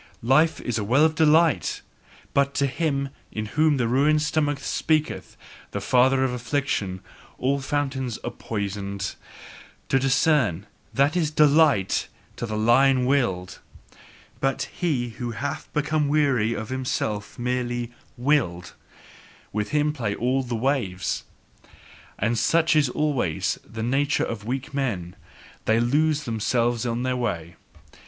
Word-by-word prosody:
Life 155 +7 +3
is 120 -3 -2
a - - -2
well 130 +9 +4
of 160 - +2
delight, 160 0 +3 0.5
but 140 0 +2
to 140 - +2
him 140 0 -1 0.2
in 110 0 -3
whom 150 +6 +2
the 120 -3 +1
ruined 150 +5 +3
stomach 150 -1 0
speaketh, 155 +2 -1 0.3
the 100 - -4
father 130 +5 +3
of 130 -2 0
affliction, 125 -7 -2 0.4
all 140 +2 +1
fountains 135 -4 -2
are - - -3
poisoned. 100 -2 -4 0.8
To 135 - +3
discern: 130 - +2 0.3
that 140 +4 +2
is 165 -4 +1
DELIGHT 150 -8 +3 0.3
to 120 - -3
the 110 -1 -3
lion 125 +4 +4
willed! 120 -10 0 0.8
But 135 0 0
he 140 -9 -1
who 120 +1 -5
hath 140 +4 -4
become 150 0 0
weary, 140 -7 +2
is 110 -1 -5
himself 125 -5 -3
merely 120 -1 -2 0.3
"willed"; 120 - 0 0.8
with 105 0 -2
him 150 0 +1
play 115 -8 -2
all 130 +3 +1
the 120 -2 -4
waves. 115 -7 -1 0.9
And 115 +2 0
such 165 +4 +3
is 145 -4 +4
always 135 - -1
the 110 0 -7
nature 140 +4 +1
of 105 -2 -6
weak 130 +4 -4
men: 100 -11 -2 0.5
they 110 +1 +3
lose 150 +5 +2
themselves 120 0 0
on 120 +1 -1
their 130 0 0
way. 85 -9 -3
130 Hz, 135 wpm, -24 LUFS, 115-145 Hz, 0.9 s, well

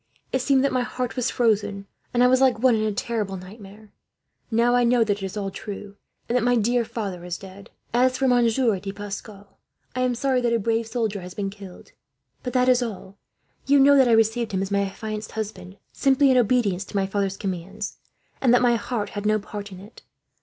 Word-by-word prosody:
It 260 - +1
seemed 265 +1 +3
that 275 - +2
my 255 - +2
heart 250 0 -3
was 250 -1 0
frozen, 205 -4 0 0.3
and 245 0 +3
I - - +7
was 255 +1 +3
like 260 -3 +4
one 250 +2 +4
in 215 -1 +1
a 215 - 0
terrible 205 -2 -3
nightmare. 205 +2 -13 0.6
Now 235 +1 +2
I 245 0 +4
know 240 0 +4
that 205 -2 -1
it - - -6
is 190 +2 -5
all 195 -1 -3
true, 205 0 -8 0.3
and 240 - -1
that 250 - +3
my 245 0 +3
dear 240 +2 +2
father 195 -6 -5
is 175 -1 -4
dead. 195 +2 -12 0.2
"As 255 +1 +3
for 270 - +1
Monsieur 235 -3 +3
de 195 +1 -5
Pascal, 205 0 -9 0.4
I 255 - -1
am 250 -1 +1
sorry 260 0 +1
that 240 -1 +1
a - - +3
brave 225 +1 0
soldier 220 -4 -2
has 180 0 -9
been 195 -1 -3
killed; 195 -3 -12 0.5
but 250 - -5
that 250 -1 +3
is 250 -1 +4
all. 200 -4 -6 0.5
You 280 +1 +5
know 285 +1 +7
that 265 -2 +5
I 235 - +4
received 225 0 +2
him, 190 0 0
as 195 - -5
my 200 0 +2
affianced 215 +2 -6
husband, 200 -3 -6 0.2
simply 275 0 +3
in 255 - +4
obedience 220 -6 +2
to - - -12
my 195 -1 +2
father's 195 0 -2
commands; 195 +2 -5 0.4
and 255 - +4
that 245 - +3
my 240 -1 +4
heart 225 -3 -3
had 205 0 -4
no 215 0 +3
part 205 0 -7
in 185 - -10
it. 205 +5 -14
220 Hz, 225 wpm, -24 LUFS, 200-245 Hz, 0.6 s, I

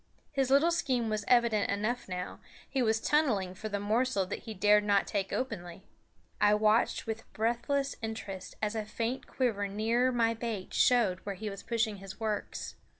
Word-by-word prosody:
His 270 -2 0
little 285 +5 +5
scheme 255 -8 0
was 215 -1 -1
evident 235 -4 +3
enough 210 +3 -1
now; 180 0 -5 0.3
he 270 - -1
was 220 -2 +2
tunneling 225 -10 +1
for 215 +4 -6
the 205 -1 -2
morsel 215 0 +1
that - - -4
he 220 -2 -6
dared 210 +2 +5
not 200 -1 +3
take 195 -2 -2
openly. 195 -8 -4 0.6
I 205 0 +6
watched 215 +2 +2
with 225 0 -5
breathless 240 +5 0
interest 220 -4 -6
as 210 0 +1
a 220 -1 -2
faint 230 +4 -3
quiver 220 -6 0
nearer 225 +5 +1
my 230 -2 +2
bait 225 -4 -5
showed 220 -8 +3
where 200 0 -5
he 210 +2 -5
was 195 - -8
pushing 225 -3 -1
his 195 +1 -10
works. 215 -2 -3
220 Hz, 175 wpm, -31 LUFS, 205-240 Hz, 0.6 s, I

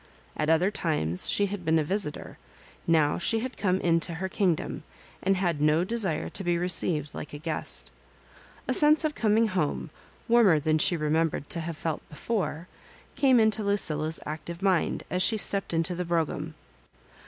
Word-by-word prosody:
At 155 0 -1
other 170 +5 +3
times 90 - -1
she 205 - +2
had 200 -2 -5
been 160 0 +2
a 155 - +2
visitor; 185 -1 -3 0.5
now 155 -3 +3
she 225 +5 +1
had 255 +1 -5
come 185 -2 0
into 165 0 +1
her 190 +3 -3
kingdom, 185 -3 -1 0.4
and 195 0 +2
had 170 -5 -1
no 155 +3 +3
de 225 +6 -3
sire 190 -9 -1
to 195 - -4
be 175 -1 +1
received 170 -4 -1
like 150 - -7
a - - -5
guest 155 +1 -3 0.8
A - - +1
sense 300 +1 +4
of 305 - 0
coming 220 -2 +2
home, 165 -3 -2 0.4
warmer 230 -9 +5
than 155 +1 +1
she 175 - +4
remembered 155 -1 -1
to 170 - 0
have 165 -1 -5
felt 160 -1 -3
before, 180 -1 -3 0.5
came 260 -3 +4
into 220 -1 +2
Lucilla's 160 -6 0
active 160 +4 -6
mind 190 -4 +1
as 180 - 0
she 220 +4 +3
stepped 200 -2 -1
into 165 +1 0
the 180 +1 -3
brougham. 160 -2 -2
170 Hz, 175 wpm, -27 LUFS, 155-200 Hz, 0.8 s, warmer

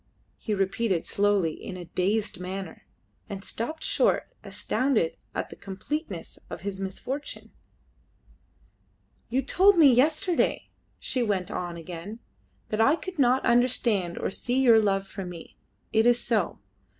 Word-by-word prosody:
he 220 - -5
repeated 195 -1 0
slowly, 200 -5 +2
in 185 - -8
a 175 - -7
dazed 200 +3 0
manner, 185 -1 -6 0.4
and 195 -1 -6
stopped 275 +11 -4
short, - - +1
astounded 255 -11 0 0.2
at - - -3
the - - -8
completeness 200 - -5
of - - -7
his 195 0 -4
misfortune. 255 +9 -5 1.8
"You 265 +3 +1
told 380 +8 +5
me 290 -6 +8
yesterday," 310 +7 +2 0.3
she 255 - 0
went 200 -6 0
on 175 -1 -4
again, 175 +5 -7 0.5
"that 215 +1 0
I 275 +7 +5
could 370 -1 -8
not 255 0 +4
understand 235 -7 +2
or - - -2
see 245 +6 -1
your 235 -4 +6
love 195 -2 +1
for 195 0 -7
me: 175 -2 -9 0.4
it 220 +1 +4
is 240 0 +5
so. 220 -8 0
215 Hz, 140 wpm, -27 LUFS, 190-255 Hz, 1.8 s, me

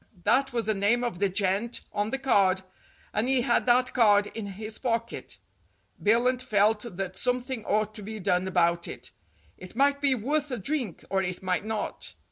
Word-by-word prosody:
That 270 +5 +3
was 235 -2 -1
the 215 - +2
name 210 +5 +2
of 235 -8 -3
the 200 -1 +2
gent 200 +4 0
on 205 +1 0
the 270 - -1
card, 195 -8 +2 0.5
and 215 +3 0
he 265 -2 +3
had 240 0 +1
that 250 +1 +3
card 205 -4 +5
in 220 -3 -5
his 215 +3 -7
pocket. 230 -2 -3 0.6
Billunt 245 +4 +3
felt 210 -3 +1
that 190 -1 -3
something 250 +1 -1
ought 215 +1 0
to 215 - -7
be 215 +2 -6
done 180 0 +1
about 170 -2 +1
it. - - -7 0.5
It 185 +3 -11
might 280 +2 +2
be 275 -2 +4
worth 290 +6 -1
a 250 - -3
drink, 235 - -3
or 190 -1 +2
it 180 0 -3
might 185 +2 0
not. 220 -1 -3
220 Hz, 185 wpm, -27 LUFS, 195-250 Hz, 0.6 s, card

